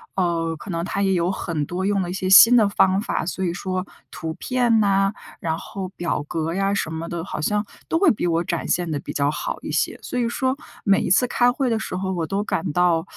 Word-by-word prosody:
呃， 170 -3 0
可 175 - -11
能 170 -2 -2
他 200 - -2
也 195 -1 +2
有 175 0 +1
很 165 -6 -3
多 180 +5 -4
用 200 -1 +1
了 175 - -5
一 - - -3
些 185 0 -2
新 225 +5 +9
的 220 -4 +5
方 190 -1 +3
法， 220 -7 -2
所 185 +2 -3
以 175 - 0
说 185 +1 -3 0.3
图 160 -1 -5
片 245 -3 +1
哪， 195 -1 +3 0.3
然 160 -1 -2
后 190 +1 -6
表 175 -4 -2
格 165 +1 -2
呀 195 +2 0
什 195 -5 -1
么 160 +1 -4
的， 170 -1 -4
好 190 - -5
像 210 +6 0 0.2
都 325 - +1
会 375 -3 +5
比 200 - -1
我 165 0 +1
展 - - -3
现 175 -1 0
得 145 - -1
比 - - -7
较 140 0 +1
好 - - -4
一 - - -5
些。 - - 0
所 250 - -3
以 235 - +1
说 260 +2 0 0.3
每 200 -2 +4
一 - - -2
次 195 +8 +4
开 245 0 +3
会 255 0 -1
的 225 - +1
时 220 - -5
候 190 +1 -2
我 170 -3 -2
都 200 +4 -1
感 190 -4 -2
到 175 -1 +2
185 Hz, 270 characters per minute, -22 LUFS, 170-205 Hz, 0.3 s, 新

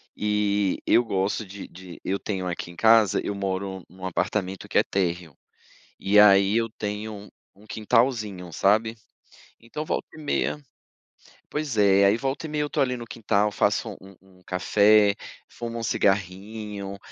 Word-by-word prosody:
e 105 -2 0
eu 120 - +4
gosto 100 +1 -1
de 100 +1 -9
de 90 -1 -12
eu 100 +1 -1
tenho 95 -3 -3
aqui 85 0 -5
em - - -15
casa, 110 -1 +5
eu - - -2
moro 95 -1 -4
em 90 - -19
um 95 - -7
apartamento 95 +2 -2
que - - -1
é - - +6
térreo, 85 -5 -2 0.6
E 100 +2 +2
aí 100 +1 +6
eu 115 0 +1
tenho 105 0 -5 0.2
um 105 +2 -20
quintalzinho, 110 -4 0
sabe? 110 +6 +2 0.6
Então 150 +7 -6
volta - - -2
e - - -11
meia 150 0 -1 0.9
pois 150 -6 -3
é, 100 -1 +5
aí 100 +3 +4
volta 135 +5 -3
e - - -5
meia 150 0 -1
eu 150 - -2
estou 145 -1 +1
ali 125 -1 -2
no 120 - -7
quintal, 105 -2 0
faço - - 0
um 95 0 -14
um 95 -1 -22
café, 100 +2 +4 0.3
fumo 115 -1 -6
um - - -5
cigarrinho, 100 0 -2
100 Hz, 165 wpm, -25 LUFS, 95-110 Hz, 0.9 s, é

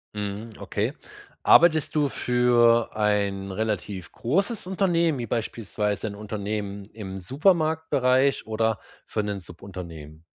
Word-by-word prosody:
Mhm, 105 +2 -5
okay. - - -2 0.5
Arbeitest 155 -3 +5
du 145 -2 +2
für 120 -2 +3
ein 100 -2 0
relativ 100 -3 -3
großes 195 - -1
Unternehmen, 170 -6 +1
wie 120 - -4
beispielsweise 105 -2 -2
'n 100 - -6
Unternehmen 100 -1 -4
im 100 -2 -8
Supermarktbereich 140 - +2
oder 110 -1 0 0.3
für 105 - -2
'nen 105 -1 -3
Subunternehmen? 85 -4 -10
110 Hz, 110 wpm, -25 LUFS, 100-135 Hz, 0.5 s, Arbeitest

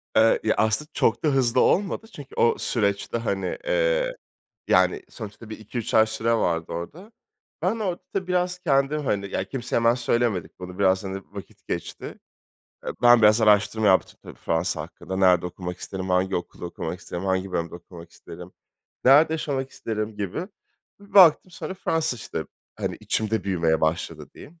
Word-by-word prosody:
Eee, 110 +1 +5
ya, 110 - +2
aslında 110 +8 +1
çok 115 - +1
da - - +2
hızlı 130 -3 +2
olmadı 205 +3 +1
çünkü 140 -2 -11
o 115 - +3
süreçte, 100 -1 -1
hani, 100 -4 -2
eee, - - +1 0.5
yani, 415 - +3
sonuçta 110 0 -10
bir 110 - -7
2-3 110 +1 -5
ay 110 - +6
süre 110 +1 -1
vardı 85 -7 0
orada. 155 - -7 0.5
Ben 195 +6 0
orada 185 -5 -2
tabii 190 -2 -2
biraz 180 0 0
kendim, 145 -2 +1
hani, 100 -4 -1
ya, - - -1
kimseye 125 -3 -4
hemen 115 0 +4
söylemedik 120 -8 -1
bunu, 90 +1 -9
biraz, 95 -1 +3
hani, 95 0 -5
vakit 100 -1 -11
geçti. - - -5 0.7
Eee, - - -1
ben 120 -1 +7
biraz 105 +2 +6
araştırma 105 0 +3
yaptım, 95 -1 +2
tabii, - - -11
Fransa 80 -1 -1
hakkında. 90 +3 -7
Nerede 90 -2 +4
okumak 90 0 -6
isterim, 95 -1 -6
hangi 95 +1 +1
okulda 90 - -7
okumak 85 - -5
isterim, 85 +2 -6
hangi 95 0 -1
bölümde 85 +1 -2
okumak 85 -1 -12
isterim, - - -12 0.5
nerede 145 +5 +6
yaşamak 135 -4 -3
isterim 110 -1 -4
gibi. 105 - -4 0.5
Bir 200 - -18
baktım 185 -1 +7
sonra 190 +2 -6
Fransa, 160 -7 -1
işte, 115 - -5 0.3
hani, - - -3
içimde 110 -2 -1
büyümeye 85 -4 +1
başladı, 80 -1 -2
diyeyim. 165 +3 -14
110 Hz, 165 wpm, -24 LUFS, 95-145 Hz, 0.7 s, ben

